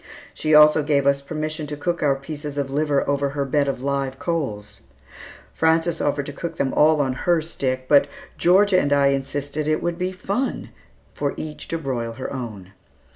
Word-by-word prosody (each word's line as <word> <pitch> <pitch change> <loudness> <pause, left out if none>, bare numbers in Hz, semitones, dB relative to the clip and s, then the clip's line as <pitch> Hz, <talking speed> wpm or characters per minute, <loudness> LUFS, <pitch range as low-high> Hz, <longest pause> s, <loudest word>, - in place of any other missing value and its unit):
She 155 0 +1
also 150 0 +7
gave 145 -2 +1
us 140 0 +3
permission 155 +1 -4
to 150 0 -5
cook 170 +3 -2
our 140 -2 +3
pieces 145 +1 -7
of 140 -1 -2
liver 145 0 +1
over 140 0 +1
her 140 - 0
bed 140 +1 +1
of 135 -2 -3
live 135 -1 -1
coals. 105 - -4 0.7
Frances 165 +1 +1
offered 145 -1 0
to 145 - -7
cook 165 +2 -5
them 135 -4 -1
all 155 0 +4
on 130 -2 0
her 170 +6 +1
stick, 130 -5 -3
but 145 0 +5 0.3
Georgia 190 +2 +4
and 145 - 0
I 140 -1 +4
insisted 145 +2 -2
that - - +2
it 155 - 0
would 175 0 -2
be 180 +1 -1
fun 200 +7 -3 0.4
for 145 -1 -2
each 155 -1 -7
to 165 - -2
broil 125 -6 -3
her 130 +4 -6
own. 105 -8 -7
145 Hz, 190 wpm, -22 LUFS, 140-160 Hz, 0.7 s, also